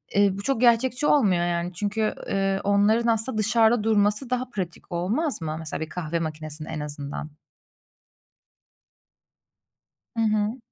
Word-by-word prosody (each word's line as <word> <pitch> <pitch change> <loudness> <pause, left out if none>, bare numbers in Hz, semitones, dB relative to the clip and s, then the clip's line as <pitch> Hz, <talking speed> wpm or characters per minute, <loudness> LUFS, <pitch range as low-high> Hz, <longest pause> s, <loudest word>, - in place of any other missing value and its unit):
eee, 200 0 +5
bu - - -5
çok 255 0 0
gerçekçi 250 +3 +3
olmuyor, 190 -12 +3
yani, 175 +1 -2
çünkü, 210 +4 -1
eee, 195 0 0
onların 205 +4 +3
aslında 225 +1 +1
dışarıda 225 +1 +3
durması 210 +3 +2
daha 250 0 -1
pratik 185 -5 -6
olmaz 210 - -1
mı? 155 -1 -3
Mesela 160 -2 -5
bir 160 - -4
kahve 170 -1 -3
makinesinin 155 -1 -4
en 160 - -4
azından? 145 0 -5 2.9
Hı - - +2
hı. 215 +1 +1
205 Hz, 135 wpm, -25 LUFS, 170-225 Hz, 2.9 s, eee